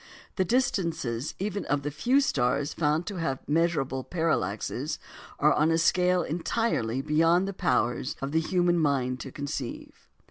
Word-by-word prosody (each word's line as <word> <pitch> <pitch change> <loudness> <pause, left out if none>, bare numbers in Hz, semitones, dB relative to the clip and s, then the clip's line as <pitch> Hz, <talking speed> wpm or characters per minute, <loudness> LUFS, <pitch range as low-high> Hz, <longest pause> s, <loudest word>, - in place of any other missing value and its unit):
The 190 - +2
distances 170 - -1
even 200 +1 -3
of 145 0 0
the 145 - -2
few 245 - +2
stars 140 - 0
found 155 +2 +1
to 200 -1 -5
have 135 -6 -3
measurable 145 -5 +1
parallaxes 165 0 -1 0.4
are - - +4
on 155 +2 +3
a 165 - +3
scale 180 +1 +3
entirely 155 - -1
beyond 165 +5 +3
the 200 - -3
powers 120 - 0
of 135 +1 -4
the 160 - +2
human 175 +1 +2
mind 130 -4 +1
to 135 - -7
conceive. 140 -3 -6
160 Hz, 150 wpm, -27 LUFS, 135-180 Hz, 0.4 s, are